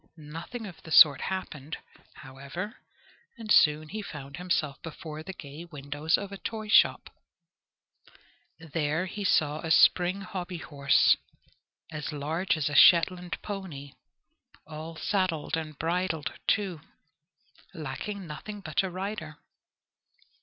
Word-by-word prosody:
Nothing 165 +10 -7
of 185 -5 -10
the - - -12
sort 150 -3 +8
happened, 160 -6 -4 0.4
however, 145 +8 -7 0.6
and 220 -2 -6
he - - +9
soon 150 0 +4 0.2
found 140 -6 -8
himself 175 -6 -1
before 155 -1 -7
the 190 - -7
gay 150 -3 -9
windows 145 -1 -1
of 200 -1 -6
a 200 - -8
toyshop. 215 -1 +3 1.5
There 160 +1 -1
he 205 +2 -5
saw 155 -5 +2
a 165 - -5
spring 180 +4 +5
hobbyhorse, 175 -7 +2 0.7
as 150 -1 -4
large 160 +5 -1
as 150 - 0
a 145 - -3
Shetland 175 +3 +5
pony, 175 -9 -6 0.7
all 160 +1 -8
saddled 185 -4 0
and 155 -2 -5
bridled, 170 -1 -1
too 190 -7 +1 0.9
lacking 180 +7 -5
nothing 175 +7 -7
but 155 -6 0
a 190 - -3
rider. 185 -4 -5
165 Hz, 115 wpm, -28 LUFS, 150-185 Hz, 1.5 s, he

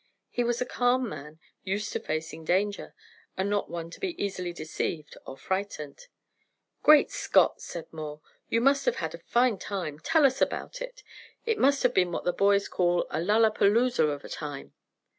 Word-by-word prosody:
He 245 - 0
was 240 0 0
a 250 - 0
calm 250 +1 +1
man, 155 -5 -9 0.2
used 200 +2 -2
to - - -1
facing 160 +1 -4
danger, 200 +5 0 0.4
and 190 +2 0
not 205 -1 0
one 170 -1 -5
to - - -11
be 365 -3 -4
easily 185 -3 -2
deceived 155 -1 -4
or 135 - -8
frightened. 190 - -4 0.7
"Great 305 -1 +6
Scott!" - - +3
said 170 -2 -6
Moore, 155 -1 -6 0.3
"you 230 - +2
must 275 +2 +3
have 245 - +2
had 160 -1 -3
a 170 - -8
fine 235 +3 +2
time. 175 -7 -4
Tell 320 - +3
us 265 0 +2
about - - -1
it. - - -7 0.4
It 455 -2 0
must 275 +1 +3
have - - +3
been 180 -2 +2
what - - -3
the 180 - +1
boys 200 +1 +3
call 175 -1 +1
a 155 - -1
'lalapazooza' 215 0 +3
of 145 -1 -5
a - - -9
time." 145 -3 -6
200 Hz, 180 wpm, -28 LUFS, 160-245 Hz, 0.7 s, Great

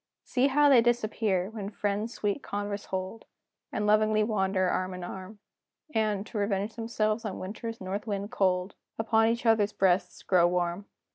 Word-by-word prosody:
See 260 +1 +2
how 290 +2 +4
they 265 -4 +7
disappear, 215 -5 0
when 205 -3 -5
friends 210 +2 -2
sweet 205 +6 -1
converse 205 -2 -4
hold, 190 +4 -5 0.5
And 210 - -1
loving 215 0 +3
wander 190 -3 +1
arm 185 +1 -1
in 180 - -7
arm; 190 +4 -8 0.6
And, 210 -2 0
to 220 - -5
revenge 200 +1 -1
themselves 225 -1 -1
on 210 -4 -4
winter's 225 +4 -6
north 195 +4 -4
wind 200 0 -3
cold, 185 0 +1 0.2
Upon 225 0 +3
each 235 +1 -1
other's 215 -2 +3
breasts 190 -1 +1
grow 175 -2 +4
warm! 175 +2 -1
205 Hz, 160 wpm, -28 LUFS, 190-225 Hz, 0.6 s, they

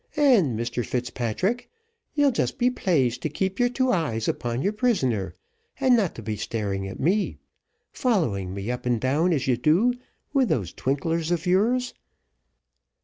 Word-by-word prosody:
And, 210 - +4
Mr 120 +1 -2
Fitzpatrick, 125 - -2 0.5
you'll 290 -2 +4
just 240 - -1
be 250 +1 +2
pleased 135 - +1
to 155 - -1
keep 190 +5 -2
your 245 0 +3
two 255 +1 +1
eyes 130 -11 -1
upon 120 +2 -2
your 200 - +1
prisoner, 135 - 0 0.4
and 260 -3 +5
not 180 - -1
be 110 -1 -2
staring 100 -2 -3
at 95 - -8
me, 195 +8 +1 0.5
following 120 - 0
me 100 +4 -4
up 125 0 -4
and 120 -2 +2
down, 145 +9 +1
as 145 -6 0
you 125 -2 +2
do, 170 - +3 0.4
with 270 -4 +3
those 95 -8 -1
twinklers 160 +5 -1
of 175 0 -1
yours." 235 +8 +2
155 Hz, 155 wpm, -25 LUFS, -, 0.5 s, and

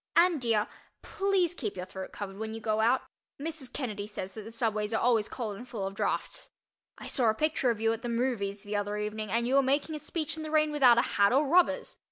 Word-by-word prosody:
And, 340 -4 +5
dear, 225 -2 +2 0.4
please 390 -4 +1
keep 220 - -4
your 180 - -4
throat 190 0 -7
covered 195 -1 -7
when 220 0 -4
you - - -5
go 215 -1 0
out—Mrs. 265 +4 -2
Kennedy 210 -7 -4
says 195 -2 -6
that 220 - -7
the 215 - -9
subways 220 -1 0
are - - +2
always 230 -3 +2
cold 220 -5 -4
and 250 +3 -10
full 210 -6 -3
of 195 - -4
draughts. - - -2 0.5
I - - -9
saw 245 -5 +2
a 220 - +1
picture 305 -2 +1
of 230 -3 0
you 225 0 +2
at 225 - -5
the 240 - -3
"movies" 230 -5 -1
the 210 0 -4
other 205 0 -1
evening 210 0 -3
and 235 +3 +1
you 255 - 0
were 275 - +6
making 280 +4 +1
a 305 - -4
speech 315 0 -1
in - - -5
the 310 - -5
rain 305 0 +3
without 260 -5 +6
a 235 - +5
hat 200 +1 +3
or 275 +3 +3
rubbers. 355 +5 +2
230 Hz, 245 wpm, -30 LUFS, 210-280 Hz, 0.5 s, were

